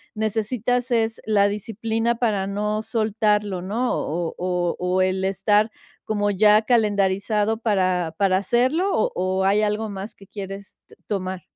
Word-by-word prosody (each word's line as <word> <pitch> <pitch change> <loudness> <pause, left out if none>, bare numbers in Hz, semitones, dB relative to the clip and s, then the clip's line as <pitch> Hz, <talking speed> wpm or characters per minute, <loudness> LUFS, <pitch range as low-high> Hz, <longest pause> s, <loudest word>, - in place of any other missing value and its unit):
necesitas 225 +3 -1
es 225 -1 0
la 205 -2 +3
disciplina 225 +3 -1
para 215 -5 0
no 210 +2 -1
soltarlo, 210 -3 0
¿no? 225 +7 -1
¿O 165 +1 -3
o 180 -1 -1
o 180 +1 +1
el 185 0 +1
estar 205 +3 +2 0.3
como 205 -1 0
ya 210 +2 +5
calendarizado 210 -1 +1
para 185 -7 0
para 195 -2 +3
hacerlo, 255 - +1
o - - +1
o 185 +1 0
hay 200 +2 +3
algo 215 +1 -1
más 200 +1 -7
que 195 - -17
quieres 195 0 -8
t - - -18
tomar? 185 -2 -3
210 Hz, 145 wpm, -23 LUFS, 190-220 Hz, 0.3 s, ya